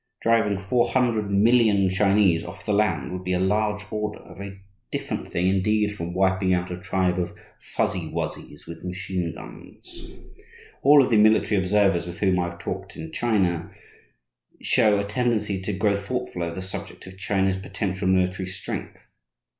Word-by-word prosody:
Driving 115 -3 +3
four 100 +5 +1
hundred 115 -5 +1
million 105 -1 +4
Chinese 95 -3 +3
off - - -10
the 105 - 0
land 105 -3 +1
would 90 0 -5
be 90 0 -1
a 90 - +1
large 105 +2 +1
order, 105 -1 -3
a - - -12
very 95 +1 -9 0.3
different - - -4
thing, 90 +2 +1
indeed, 105 +2 +1
from 85 -2 -5
wiping 95 0 +2
out 90 0 -3
a 90 - -4
tribe 95 -2 0
of 90 0 -4 0.2
"Fuzzy - - -2
Wuzzys" 75 - -5
with 85 - -10
machine 90 -1 -3
guns. - - -12 0.7
All 145 0 +7
of 125 - -2
the 110 - +5
military 105 -1 +4
observers 95 -2 +2
with 85 0 -7
whom 95 -3 +2
I 85 0 0
have 85 - -11
talked 95 +2 -6
in 160 - -7
China 100 - 0 0.9
show 105 -2 +3
a - - 0
tendency 105 -3 -1
to 100 - -2
grow 100 +1 +1
thoughtful 100 -1 -4
over 85 -1 -3
the 95 - -5
subject 95 - -7
of 95 0 -12
China's 95 -1 +1
potential 95 -1 -3
military 95 0 +1
strength. 95 - -6
95 Hz, 170 wpm, -24 LUFS, 90-105 Hz, 0.9 s, All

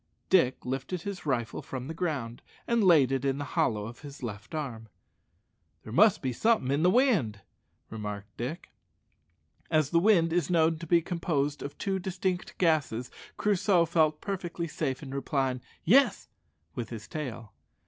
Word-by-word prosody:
Dick 165 -9 +3
lifted 135 +7 -3
his 190 -5 -6
rifle 120 -5 -1
from 130 -1 -6
the 160 - -4
ground, 145 -9 -3 0.2
and 235 -2 +2
laid 155 -8 +6
it 135 -1 0
in 135 -1 0
the 145 - -3
hollow 105 -2 +1
of 115 +2 -9
his 145 -2 -11
left 110 +6 -6
arm. 115 -8 -5 0.9
"There 110 - -9
must 205 - +5
be 130 -1 -1
something 220 - +2
in 140 +2 +1
the 180 - +5
wind," 185 - +2 0.5
remarked 105 -1 -6
Dick. 130 +8 -5 1.0
As 155 -3 +2
wind 170 -2 +4
is 175 -3 +1
known 165 -2 +3
to 170 - -7
be 170 +1 +4
composed 150 -5 -1
of 140 - -6
two 195 -1 -1
distinct 185 0 -3
gases, 150 -9 +1 0.3
Crusoe 195 -3 +3
felt 155 -2 +2
perfectly 175 -4 -4
safe 145 -3 -3
in 135 -1 -7
replying 135 -2 -1 0.2
"Yes" 265 - +4 0.4
with 120 -3 -5
his 110 -3 -8
tail. 120 -8 -6
150 Hz, 160 wpm, -29 LUFS, 125-175 Hz, 1.0 s, laid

